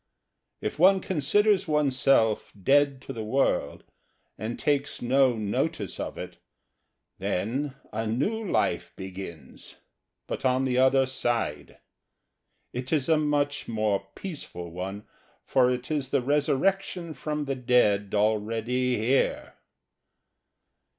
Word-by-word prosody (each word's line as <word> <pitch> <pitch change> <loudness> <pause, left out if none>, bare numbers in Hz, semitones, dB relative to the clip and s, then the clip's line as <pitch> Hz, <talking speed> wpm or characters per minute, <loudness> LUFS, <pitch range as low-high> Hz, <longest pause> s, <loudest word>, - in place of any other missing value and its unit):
If 105 - -4
one 190 +3 +6
considers 190 +4 +2
oneself 135 -7 +2
dead 140 +4 +3
to - - -6
the 110 - -5
world 130 +6 0 0.5
and 110 +3 -5
takes 145 0 0
no 130 0 +3
notice 105 -2 -2
of - - -4
it, - - -7 0.8
then 130 +9 -2 0.2
a 110 +1 -2
new 170 - -1
life 200 - 0
begins, 95 -6 -9 0.5
but - - -5
on 130 0 +2
the 125 -1 +1
other 135 +1 +5
side; 120 - -2 1.0
it 125 +1 -5
is 150 -2 +1
a 160 - +5
much 145 -1 0
more 105 -3 0
peaceful 115 - -7
one, 95 +4 -6 0.4
for 125 -2 +3
it 125 +3 -3
is 145 -4 -1
the - - +2
resurrection 165 +5 0
from 150 -1 -3
the 135 - -1
dead 115 -6 +2
already 115 +4 +1
here! 120 +5 0
130 Hz, 115 wpm, -27 LUFS, 110-145 Hz, 1.0 s, one